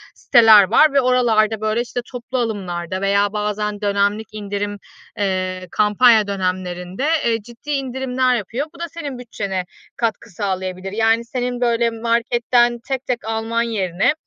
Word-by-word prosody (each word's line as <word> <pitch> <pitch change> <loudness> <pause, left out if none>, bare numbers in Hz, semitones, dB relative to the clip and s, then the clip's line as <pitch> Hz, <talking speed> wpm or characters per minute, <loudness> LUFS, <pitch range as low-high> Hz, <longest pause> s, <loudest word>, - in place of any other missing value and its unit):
siteler 220 -3 +7
var 305 -2 +5
ve 275 - +4
oralarda, 225 -4 +2
böyle, 215 +2 0
işte, 245 0 -4
toplu 250 +1 -5
alımlarda 185 -6 -3
veya 200 +1 +2
bazen 210 0 -2
dönemlik 205 +1 0
indirim, 205 -1 -4 0.4
ııı, 185 -2 -1
kampanya 215 +1 +4
dönemlerinde, 185 +2 -3 0.2
eee, 230 -1 +1
ciddi 235 +6 -14
indirimler 260 -2 0
yapıyor. 240 +6 -3
Bu - - -14
da 340 0 -4
senin 290 -5 -6
bütçene 200 -6 -4 0.3
katkı 230 0 -2
sağlayabilir. 190 -1 -4
Yani, 225 +2 +2
senin 245 0 -3
böyle 235 -1 +2
marketten 235 +1 +1
tek 265 -1 -3
tek 245 -3 -2
alman 225 +1 -1
yerine, 195 0 0
225 Hz, 140 wpm, -20 LUFS, 200-245 Hz, 0.4 s, siteler